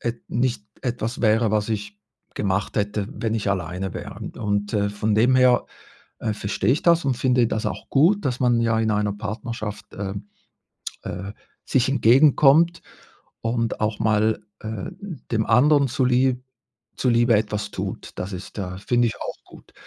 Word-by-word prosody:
et 120 Hz, 0 st, -4 dB
nicht 120 Hz, -3 st, 0 dB, 0.2 s
etwas 120 Hz, -1 st, -3 dB
wäre, 110 Hz, -1 st, +3 dB
was 105 Hz, +1 st, 0 dB
ich 105 Hz, -1 st, -4 dB, 0.4 s
gemacht 95 Hz, 0 st, -1 dB
hätte, 105 Hz, -1 st, -1 dB
wenn 115 Hz, -1 st, -2 dB
ich 105 Hz, -2 st, -1 dB
alleine 90 Hz, 0 st, -3 dB
wäre. -, -, -6 dB, 0.2 s
Und, 105 Hz, -1 st, -1 dB
äh, 100 Hz, -1 st, +1 dB
von 105 Hz, +1 st, -1 dB
dem 125 Hz, +4 st, +4 dB
her, 125 Hz, -1 st, +4 dB, 0.5 s
äh, 110 Hz, -, -1 dB
verstehe 100 Hz, +4 st, 0 dB
ich 150 Hz, -, -1 dB
das 170 Hz, -2 st, +4 dB
und 130 Hz, -3 st, +1 dB
finde 125 Hz, -2 st, +3 dB
das 110 Hz, +1 st, -2 dB
auch -, -, -5 dB
gut, 175 Hz, +9 st, +3 dB
dass 130 Hz, -1 st, -1 dB
man 120 Hz, -2 st, +3 dB
ja 115 Hz, -1 st, +2 dB
in 110 Hz, -1 st, +1 dB
einer 105 Hz, -1 st, +1 dB
Partnerschaft, 105 Hz, 0 st, -5 dB
ähm, 100 Hz, +1 st, -5 dB, 0.8 s
äh, 100 Hz, +2 st, -5 dB, 0.3 s
sich 130 Hz, -1 st, +2 dB
entgegenkommt 140 Hz, +6 st, +5 dB, 0.6 s
und 115 Hz, 0 st, -1 dB
auch 110 Hz, 0 st, -1 dB
mal, 110 Hz, 0 st, +1 dB, 0.2 s
äh, 110 Hz, -, -5 dB, 0.4 s
dem 110 Hz, -1 st, +1 dB
anderen 140 Hz, +4 st, +4 dB
zu 130 Hz, +1 st, 0 dB
Li 125 Hz, 0 st, +2 dB, 0.6 s
zu 125 Hz, -, +1 dB
Liebe 120 Hz, -1 st, +4 dB
etwas 105 Hz, 0 st, -1 dB
tut. -, -, -5 dB
Das 95 Hz, -, -5 dB
ist, 90 Hz, +4 st, -8 dB
äh, 90 Hz, -1 st, -4 dB
finde 120 Hz, +4 st, +1 dB
ich 110 Hz, -, -4 dB
auch -, -, -6 dB
gut. -, -, -17 dB
110 Hz, 165 wpm, -23 LUFS, 105-125 Hz, 0.8 s, entgegenkommt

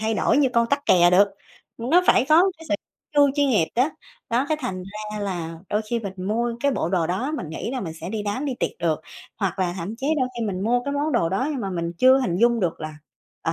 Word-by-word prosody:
thay 220 Hz, 0 st, 0 dB
đổi -, -, +2 dB
như 275 Hz, -3 st, +4 dB
con 235 Hz, 0 st, +4 dB
tắc 280 Hz, +3 st, -1 dB
kè 175 Hz, -1 st, +6 dB
được. 200 Hz, +3 st, +5 dB, 0.5 s
Nó 290 Hz, +10 st, +3 dB
phải -, -, +5 dB
có 345 Hz, +5 st, +6 dB
cái 325 Hz, -, -12 dB
sự -, -, +2 dB, 0.4 s
chu 285 Hz, -1 st, +5 dB
chuyên 285 Hz, -1 st, +2 dB
nghiệp 205 Hz, -10 st, +2 dB
đó. 255 Hz, +6 st, +2 dB, 0.4 s
Đó, 250 Hz, +4 st, +1 dB
cái 310 Hz, -, +1 dB
thành 185 Hz, -8 st, -4 dB
ra 210 Hz, +2 st, -7 dB
là 175 Hz, -5 st, -3 dB
đôi 210 Hz, +1 st, 0 dB
khi 235 Hz, -, +1 dB
mình 200 Hz, -4 st, -5 dB, 0.2 s
mua 235 Hz, +2 st, 0 dB
cái 280 Hz, +1 st, +2 dB
bộ 165 Hz, -, -1 dB
đồ 175 Hz, -3 st, +1 dB
đó, 235 Hz, -, -2 dB
mình 170 Hz, -, -5 dB
nghĩ 160 Hz, -, -4 dB
là 260 Hz, -1 st, -3 dB
mình 165 Hz, -4 st, -5 dB
sẽ -, -, -5 dB
đi 215 Hz, -1 st, -3 dB
đám 210 Hz, +8 st, -2 dB
đi 270 Hz, -3 st, -2 dB
tiệc -, -, +1 dB
được. 165 Hz, -2 st, 0 dB, 0.4 s
Hoặc 195 Hz, -3 st, -2 dB
là 180 Hz, -2 st, 0 dB
thậm 185 Hz, +6 st, -4 dB
chí 265 Hz, -, -4 dB
đôi 255 Hz, -, +1 dB
khi 230 Hz, -, -1 dB
mình 185 Hz, -2 st, -3 dB
mua 245 Hz, +2 st, +2 dB
cái 280 Hz, -, -2 dB
món 295 Hz, +2 st, 0 dB
đồ 200 Hz, -10 st, +2 dB
đó 195 Hz, +10 st, 0 dB
nhưng 275 Hz, -, -3 dB
mà 195 Hz, -3 st, -3 dB
mình 170 Hz, -2 st, -3 dB
chưa 260 Hz, +1 st, +6 dB
hình 205 Hz, -10 st, 0 dB
dung 235 Hz, +2 st, +3 dB
được 175 Hz, -4 st, -1 dB
là, 155 Hz, -1 st, -5 dB, 0.5 s
ờ, -, -, 0 dB
220 Hz, 265 wpm, -23 LUFS, 185-260 Hz, 0.5 s, kè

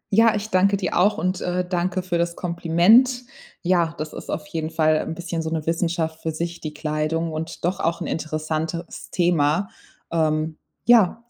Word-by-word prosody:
Ja, 225 Hz, 0 st, +6 dB
ich 210 Hz, +1 st, -4 dB
danke 195 Hz, +2 st, +4 dB
dir 185 Hz, -3 st, -2 dB
auch 200 Hz, +4 st, +3 dB
und, 185 Hz, 0 st, -1 dB
äh, 180 Hz, 0 st, -1 dB
danke 180 Hz, 0 st, -1 dB
für 175 Hz, -2 st, -1 dB
das 170 Hz, 0 st, 0 dB
Kompliment. 180 Hz, +9 st, +4 dB, 0.4 s
Ja, 170 Hz, -2 st, +2 dB
das 155 Hz, 0 st, -5 dB
ist -, -, -9 dB
auf 150 Hz, -, -3 dB
jeden 155 Hz, +1 st, -3 dB
Fall 155 Hz, -1 st, +3 dB
'n 160 Hz, -, -4 dB
bisschen 170 Hz, -1 st, -3 dB
so 160 Hz, -, -3 dB
'ne 160 Hz, -2 st, -2 dB
Wissenschaft 165 Hz, -1 st, -1 dB
für 160 Hz, -, -2 dB
sich, 170 Hz, +2 st, -4 dB
die 155 Hz, -, -4 dB
Kleidung, 155 Hz, +2 st, -1 dB
und 160 Hz, +1 st, -5 dB
doch 180 Hz, +2 st, 0 dB
auch 165 Hz, +1 st, 0 dB
'n -, -, -4 dB
interessantes 155 Hz, +1 st, -3 dB
Thema. 170 Hz, +1 st, +2 dB, 0.4 s
Ähm, 155 Hz, -1 st, 0 dB, 0.3 s
ja, 235 Hz, -1 st, +5 dB
170 Hz, 180 wpm, -23 LUFS, 160-180 Hz, 0.4 s, Ja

